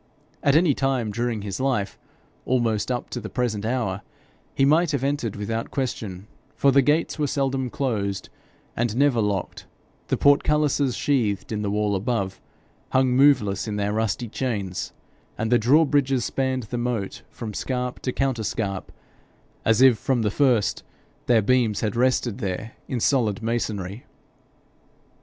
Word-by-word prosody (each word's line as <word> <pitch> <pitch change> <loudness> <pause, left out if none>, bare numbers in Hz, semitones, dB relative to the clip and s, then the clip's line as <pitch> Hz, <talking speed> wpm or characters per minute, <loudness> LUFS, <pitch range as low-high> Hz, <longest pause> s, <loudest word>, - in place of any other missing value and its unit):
At 140 0 +3
any 160 -2 +5
time 135 -6 0
during 115 -1 -2
his 100 -2 -4
life, 130 -7 -1 0.4
almost 120 -3 0
up 125 - -3
to 120 - -3
the 110 - -6
present 120 -5 -1
hour, 115 -6 -1 0.5
he 135 - +3
might 160 +4 +4
have 135 -2 -1
entered 140 -6 -1
without 115 +3 -3
question, 105 -8 -4 0.3
for 140 - +4
the 140 +1 +5
gates 150 +4 +1
were 150 - +1
seldom 135 -2 -1
closed 100 -8 -2 0.5
and 115 -2 -1
never 135 -4 +3
locked, 100 -3 -2 0.4
the - - 0
portcullises, 145 -2 +3
sheathed 115 -10 0
in 105 -1 -2
the 105 - -1
wall 105 0 0
above, 100 -2 -2 0.5
hung 130 0 +4
moveless 125 -8 +3
in 105 - -3
their 105 0 -1
rusty 110 +2 -1
chains, 105 -6 -3 0.5
and 110 +1 -2
the 120 - +5
drawbridges 135 0 +3
spanned 130 -1 -1
the 120 +3 -4
moat 120 -5 -3
from 110 -3 -7
scarp 125 +2 -3
to 130 - -2
counterscarp, 110 -7 -2 0.7
as 115 +3 +4
if 130 -4 +6
from 130 -4 0
the 105 - +1
first 125 -5 +2 0.5
their 115 -3 +4
beams 120 -3 +2
had 105 -1 -1
rested 125 -2 +1
there 100 +1 -3 0.2
in 130 - -2
solid 115 -5 +1
masonry. 110 -2 -3
120 Hz, 150 wpm, -24 LUFS, 105-135 Hz, 0.7 s, if